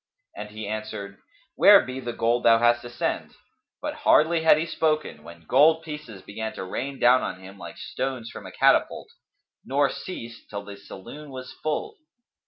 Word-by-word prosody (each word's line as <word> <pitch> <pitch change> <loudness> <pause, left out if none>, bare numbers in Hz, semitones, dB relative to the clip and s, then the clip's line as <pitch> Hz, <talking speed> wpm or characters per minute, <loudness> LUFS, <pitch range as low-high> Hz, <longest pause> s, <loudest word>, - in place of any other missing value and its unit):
And - - -7
he 110 0 -7
answered, 105 -2 -6 0.3
"Where - - +8
be 130 +1 -5
the 120 -2 -4
gold 115 +1 +1
thou 115 -1 +6
hast 120 +1 +3
to 120 - -9
send?" 120 - -3 0.5
But - - -2
hardly 160 +2 +4
had 160 -2 +6
he 160 - -1
spoken, 155 - -1
when 85 +1 -13
gold 155 - +5
pieces 150 - -8
began 110 +2 -5
to - - -6
rain 135 +9 -4
down 125 +1 +5
on 90 - -4
him, 95 +1 -12
like - - -9
stones 130 -3 -4
from - - -9
a - - -9
catapult, - - +2 0.5
nor 140 +1 +1
ceased 120 -10 -8
till 100 -1 -5
the 100 - -8
saloon 145 +11 -11
was 130 -1 -8
full. 420 - -3
120 Hz, 180 wpm, -25 LUFS, 105-150 Hz, 0.5 s, Where